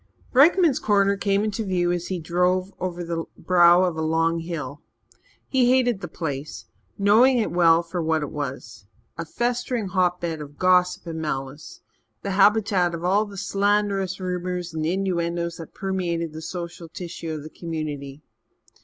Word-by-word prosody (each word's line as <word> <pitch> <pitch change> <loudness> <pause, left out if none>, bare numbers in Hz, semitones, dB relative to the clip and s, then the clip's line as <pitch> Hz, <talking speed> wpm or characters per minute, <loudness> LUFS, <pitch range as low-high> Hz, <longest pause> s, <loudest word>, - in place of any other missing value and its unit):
Rykman's 305 +2 +5
Corner 200 -5 +2
came 200 0 +1
into 215 +1 -2
view 180 -3 0
as 175 -1 -2
he 185 - -2
drove 180 +3 0
over 175 -1 -3
the 165 -1 -3
brow 175 0 +5
of 180 -3 0
a 160 - -3
long 165 +1 +1
hill. 150 -4 -6 0.7
He 255 -2 +3
hated 245 -5 +2
the 175 - -5
place, 150 -3 -5 0.3
knowing 225 +6 +5
it 225 - 0
well 170 -1 +4
for 175 +1 -4
what 160 -1 0
it 145 - -5
was 125 -7 -6 0.3
a 165 - -3
festering 240 +1 -2
hotbed 175 -3 0
of 145 -1 -10
gossip 180 -1 +3
and 165 -1 -5
malice, 135 -1 -5 0.4
the 200 - -2
habitat 195 -3 +3
of 165 - -7
all 200 +4 +2
the 200 -1 -10
slanderous 200 -1 0
rumours 180 -1 -3
and 155 -1 -2
innuendoes 170 -2 -1
that 165 - -10
permeated 175 -4 -2
the 160 - -7
social 170 0 -7
tissue 170 -1 -7
of 155 -2 -5
the 155 - -9
community. 150 -4 -6
175 Hz, 160 wpm, -24 LUFS, 165-195 Hz, 0.7 s, Rykman's